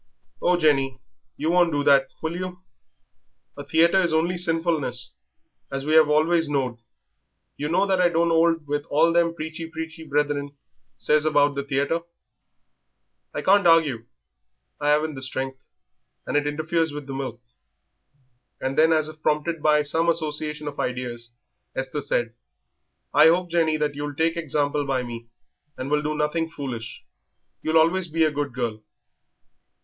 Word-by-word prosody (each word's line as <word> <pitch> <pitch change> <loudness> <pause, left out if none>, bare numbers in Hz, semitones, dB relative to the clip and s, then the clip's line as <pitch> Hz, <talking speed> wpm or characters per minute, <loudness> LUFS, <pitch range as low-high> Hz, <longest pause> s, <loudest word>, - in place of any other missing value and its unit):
"Oh, 180 0 +3
Jenny, 135 -5 +2 0.4
you 155 +3 0
won't 175 -1 +4
do 145 -1 0
that, 140 -1 +5 0.2
will 160 +1 -2
you? 180 0 -6 0.9
A 145 - -7
theatre 165 +6 +3
is 170 -3 +1
only 165 +3 +1
sinfulness, 165 - -1 0.6
as 135 0 -4
we 155 +1 +2
'ave 155 -2 +6
always 160 +1 +3
knowed." 130 -5 -1 0.8
"You 150 +1 -4
know 175 +4 +2
that 190 -2 +1
I 175 - +4
don't 170 0 +1
'old 165 -1 +2
with 145 0 -2
all 165 +3 +3
them 170 -1 +2
preachy 160 +1 -6
preachy 160 0 -7
brethren 145 -1 -1 0.4
says 150 0 +2
about 145 -2 +3
the 140 - -2
theatre." 140 +4 -1 1.3
"I - - -5
can't 200 -1 +4
argue 150 -9 +3 0.7
I 145 - 0
'aven't 150 +1 +2
the 135 - -8
strength, 130 0 -1 0.6
and - - -4
it 145 0 +2
interferes 160 +2 0
with 145 -1 -7
the 135 - -7
milk." 130 -4 -5 1.2
And 135 +1 -2
then, 160 +2 +4
as 155 -1 +2
if 155 0 -11
prompted 155 +2 0
by 150 0 +3
some 165 +3 0
association 150 -2 -2
of 145 - -6
ideas, 120 -2 -4 0.5
Esther 135 +3 -3
said, 120 -4 -1 0.8
"I 155 - +7
hope, 175 +1 +2
Jenny, 160 -2 +2
that 150 -1 -1
you'll 145 0 -5
take 165 +2 +1
example 145 -2 -1
by 135 -2 -1
me 115 -1 -8 0.5
and 130 +2 -5
will 150 0 +2
do 150 0 -2
nothing 160 +2 -1
foolish; 130 -8 -7 0.6
you'll 160 +1 +1
always 170 +3 +3
be 165 0 +1
a 155 - +2
good 145 -1 -3
girl." 115 -4 -3
150 Hz, 160 wpm, -24 LUFS, 140-165 Hz, 1.3 s, I